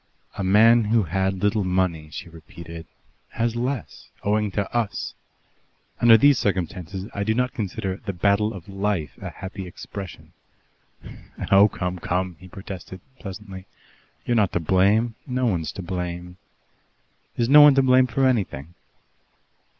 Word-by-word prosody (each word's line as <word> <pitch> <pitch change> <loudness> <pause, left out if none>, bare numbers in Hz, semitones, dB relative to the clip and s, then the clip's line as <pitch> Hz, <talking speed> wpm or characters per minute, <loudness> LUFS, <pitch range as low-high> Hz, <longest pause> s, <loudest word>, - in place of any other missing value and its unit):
"A 100 - -3
man 110 +4 +5
who 110 +1 +2
had 95 +2 -1
little 105 0 +2
money," 90 -4 -1
she 75 - -8
repeated, 85 0 -11 0.5
"has 115 0 -1
less, 125 +1 -4
owing 105 +1 +1
to 100 -2 -1
us. 115 -4 -2 0.9
Under 115 -1 +7
these 145 +2 +5
circumstances 95 0 -3
I 100 - -2
do 110 +2 0
not 125 0 0
consider 95 -2 -3
'the 100 - -6
battle 100 +4 +2
of 95 -6 -10
life' 100 -5 -2
a - - -5
happy 95 -1 -8
expression." 95 +1 -9 1.2
"Oh 100 +1 +7
come, 90 -1 -4
come!" 90 +1 -2
he 95 - -13
protested 95 0 -9 0.2
pleasantly. 95 -2 -9 0.6
"You're 120 - 0
not 105 -5 +2
to - - +1
blame. 100 +7 +2
No 130 -1 -1
one's 85 -9 -1
to 95 - -7
blame." 90 0 -5 1.0
"Is 120 - +1
no 145 +3 +8
one 145 -2 +8
to 135 - +4
blame 130 0 +5
for 135 +3 +1
anything?" 95 - -1
100 Hz, 145 wpm, -23 LUFS, 90-115 Hz, 1.2 s, no